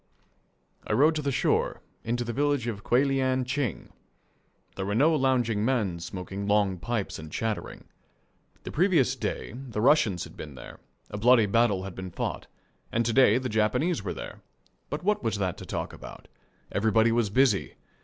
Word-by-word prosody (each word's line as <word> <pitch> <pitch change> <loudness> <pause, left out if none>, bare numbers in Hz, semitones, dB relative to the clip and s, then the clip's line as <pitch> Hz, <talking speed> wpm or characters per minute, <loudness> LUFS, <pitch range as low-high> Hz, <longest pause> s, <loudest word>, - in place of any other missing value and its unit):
I - - 0
rode 145 +8 +5
to 155 - -2
the 140 -1 -1
shore, - - 0 0.2
into 120 +1 -1
the 120 0 -4
village 145 -1 +1
of 110 -4 -4
Kuelian 130 0 +2
Ching. 130 - -3 0.8
There 95 0 -3
were 100 - -1
no 150 +7 +4
lounging 125 -6 +1
men 110 -8 0
smoking 95 +3 -6
long 100 -3 +2
pipes 115 +1 -3
and 80 0 -9
chattering. 110 +3 -3 0.8
The - - -6
previous 160 -7 +3
day 130 - -4
the 125 -4 -6
Russians 110 - +3
had - - -11
been 75 -3 -9
there, - - -11 0.3
a 105 - -4
bloody 120 0 +5
battle 105 -2 +2
had 95 -1 -6
been 95 0 -7
fought, - - -4 0.4
and 115 0 +1
to 115 - 0
day 125 -3 +5
the 130 0 -2
Japanese 110 - +1
were 95 - -4
there - - -8 0.5
but 150 - -4
what 210 +2 +1
was 110 -2 0
that 95 -3 -1
to - - -9
talk - - -4
about? - - -11 0.4
Everybody 110 +2 +3
was 115 -2 +1
busy. 120 -2 +2
115 Hz, 175 wpm, -27 LUFS, 100-130 Hz, 0.8 s, rode